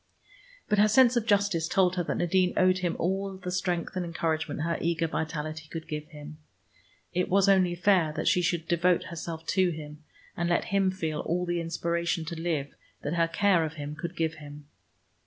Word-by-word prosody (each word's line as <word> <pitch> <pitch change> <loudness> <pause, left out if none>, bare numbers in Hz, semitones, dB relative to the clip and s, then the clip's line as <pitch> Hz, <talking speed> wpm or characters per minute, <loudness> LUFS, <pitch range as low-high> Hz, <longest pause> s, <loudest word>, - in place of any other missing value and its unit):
But 210 - +2
her 210 - +6
sense 245 +3 +5
of 235 -2 0
justice 200 -6 +2
told 185 0 +2
her 180 - 0
that - - -2
Nadine 180 +1 +2
owed 185 0 +4
him 175 -2 -1
all 190 +2 -2
the 180 -1 -5
strength 180 -1 -2
and 185 - -1
encouragement 160 -2 -2
her 170 0 -1
eager 165 0 0
vitality 155 -1 -4
could 165 -1 -7
give 150 0 -5
him. 150 0 -11 0.7
It 180 +1 0
was 195 +1 +4
only 185 -3 +4
fair 175 -3 +3
that 155 - -3
she 180 - +4
should 170 -1 -1
devote 175 +1 +2
herself 165 -1 -6
to 185 0 +2
him, 155 -2 -8 0.3
and 170 -1 -1
let 175 - +1
him 195 -1 +3
feel 160 -5 -3
all 180 +2 -1
the 175 -1 -1
inspiration 170 0 -1
to 165 0 -5
live 155 -5 -2 0.3
that 145 - -2
her 170 -1 +2
care 180 0 +3
of 160 0 -3
him 150 -1 -6
could 170 +4 -6
give 160 -1 0
him. 145 0 -10
170 Hz, 195 wpm, -28 LUFS, 160-185 Hz, 0.7 s, her